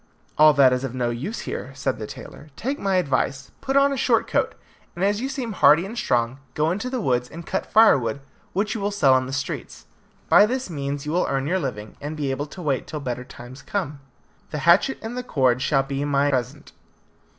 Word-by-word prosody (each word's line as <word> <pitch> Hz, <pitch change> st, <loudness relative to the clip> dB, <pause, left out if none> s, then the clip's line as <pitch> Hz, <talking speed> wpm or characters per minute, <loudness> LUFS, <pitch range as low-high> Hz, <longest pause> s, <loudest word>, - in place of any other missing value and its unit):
"All 155 Hz, 0 st, +7 dB
that 130 Hz, -2 st, +6 dB
is 125 Hz, +1 st, -1 dB
of 130 Hz, -2 st, -4 dB
no 120 Hz, -2 st, 0 dB
use 145 Hz, -, -4 dB
here," -, -, -5 dB
said 135 Hz, -, -2 dB
the 110 Hz, -, -5 dB
tailor. 145 Hz, -, -11 dB
"Take 275 Hz, +4 st, -3 dB
my 195 Hz, -1 st, 0 dB
advice, 140 Hz, -4 st, 0 dB
put 270 Hz, +1 st, 0 dB
on 280 Hz, 0 st, +4 dB
a -, -, -1 dB
short 240 Hz, -3 st, +2 dB
coat, -, -, 0 dB, 0.4 s
and 180 Hz, +3 st, 0 dB
as 205 Hz, +2 st, +1 dB
you 265 Hz, -, -2 dB
seem 260 Hz, -4 st, -4 dB
hardy 170 Hz, -3 st, +5 dB
and 215 Hz, +4 st, -7 dB
strong, 120 Hz, -, 0 dB, 0.2 s
go 155 Hz, +2 st, +1 dB
into 205 Hz, +8 st, -3 dB
the 255 Hz, -1 st, -2 dB
woods 125 Hz, -, 0 dB
and 165 Hz, +1 st, -9 dB
cut 190 Hz, -, -3 dB
firewood, 140 Hz, -, +4 dB, 0.3 s
which 205 Hz, +3 st, 0 dB
you 220 Hz, -, -4 dB
will 200 Hz, -, 0 dB
sell 175 Hz, -11 st, +4 dB
in 130 Hz, -, -5 dB
the -, -, -6 dB
streets. 135 Hz, 0 st, -5 dB, 0.4 s
By 205 Hz, -, +6 dB
this 250 Hz, -4 st, -3 dB
means 140 Hz, -1 st, -4 dB
you 150 Hz, -, -3 dB
will 175 Hz, +2 st, +1 dB
earn 135 Hz, 0 st, -1 dB
your 185 Hz, +5 st, 0 dB
living, 110 Hz, -, -5 dB
and 150 Hz, +2 st, -5 dB
be 140 Hz, -3 st, -1 dB
able 145 Hz, +3 st, -3 dB
to 180 Hz, +4 st, -10 dB
wait 140 Hz, -4 st, -1 dB
till 155 Hz, -, -5 dB
better 125 Hz, -3 st, -4 dB
times 125 Hz, +1 st, -12 dB
come. 160 Hz, -8 st, -3 dB, 0.5 s
The 150 Hz, -, -4 dB
hatchet 180 Hz, +10 st, +4 dB
and 225 Hz, +2 st, -5 dB
the 250 Hz, -, -2 dB
cord 130 Hz, -, +1 dB
shall 135 Hz, 0 st, +2 dB
be 135 Hz, +1 st, -3 dB
my 145 Hz, 0 st, +2 dB
present." 130 Hz, +2 st, -3 dB
145 Hz, 225 wpm, -23 LUFS, 130-200 Hz, 0.5 s, All